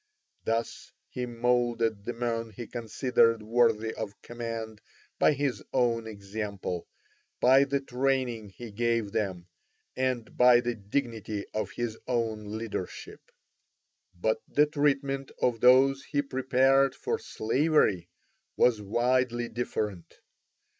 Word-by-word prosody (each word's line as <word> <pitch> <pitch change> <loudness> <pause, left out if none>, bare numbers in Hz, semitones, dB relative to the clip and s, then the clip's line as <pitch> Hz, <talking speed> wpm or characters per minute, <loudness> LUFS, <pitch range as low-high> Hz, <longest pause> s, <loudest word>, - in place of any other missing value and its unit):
Thus 115 +1 -2 0.2
he 125 -1 -4
moulded 120 -3 0
the 120 - -3
men 115 -1 -2
he 115 +3 -8
considered 115 -1 +1
worthy 115 -1 +2
of 105 -2 -6
command 115 -2 -6 0.4
by - - +5
his 140 -2 -2
own 115 -3 +1
example, 100 -3 -5 0.5
by 135 +2 +6
the 140 0 0
training 125 -4 -1
he 110 +4 -10
gave 115 -1 0
them, 95 -5 -2 0.5
and 130 -3 -2
by 125 -1 +7
the 120 0 -1
dignity 110 -1 -3
of 110 - -3
his 115 -2 -4
own 110 -3 -2
leadership. 110 -5 -6 0.9
But 110 +4 0
the 150 - +4
treatment 140 -2 0
of 120 -2 +1
those 135 +2 +5
he 145 -1 0
prepared 135 0 +3
for - - -2
slavery 110 - +1 0.5
was 115 -4 +4
widely 120 +2 +1
different. 105 -6 -4
120 Hz, 115 wpm, -28 LUFS, 110-130 Hz, 0.9 s, by